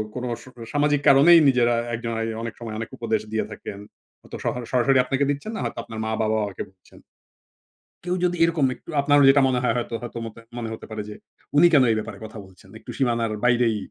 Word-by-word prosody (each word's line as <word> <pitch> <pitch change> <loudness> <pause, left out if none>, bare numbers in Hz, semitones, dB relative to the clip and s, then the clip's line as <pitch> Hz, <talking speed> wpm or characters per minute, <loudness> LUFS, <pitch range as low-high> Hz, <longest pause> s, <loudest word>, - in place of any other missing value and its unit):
কোন 125 - -4 0.2
স - - -17 0.3
সামাজিক 145 0 +2
কারণেই 155 +5 +8
নিজেরা 120 -2 +3 0.2
একজন 115 0 -5
আ - - -1 0.2
অনেক 115 - -5
সময় 115 -2 -6
অনেক 115 - -5
উপদেশ 110 -2 -1
দিয়ে 110 -1 0
থাকেন। 100 -1 -8 0.4
হয়তো - - -9
সহার 125 - -2
সরাসরি 130 +1 +3
আপনাকে 135 +2 0
দিচ্ছেন 145 +9 -3
না - - -4
হয়তো - - -4
আপনার 110 -1 -8
মা-বাবা 110 0 0
ও - - -5
কে - - -3
দিচ্ছেন। 95 -1 -21 1.0
কেউ 180 0 -1
যদি 175 0 0
এরকম 165 -4 +2
একটু - - -19
আপনার 145 +1 +3
যেটা 140 +1 +6
মনে 125 -1 +1
হয় 120 - +2
হয়তো 120 -1 -4
হয়তো 120 -1 -7
মতে 115 0 -9 0.2
মনে 115 -2 -4
হতে - - -9
পারে 110 -1 -4
যে - - -7 0.4
উনি 170 +4 +8
কেন 140 - +6
এই - - +2
ব্যাপারে 110 -2 -7
কথা 110 0 -10
বলছেন? 95 0 -19
একটু 110 - -10
সীমানার 115 -4 0
বাইরেই 120 -3 +3
120 Hz, 210 wpm, -23 LUFS, 110-140 Hz, 1.0 s, কারণেই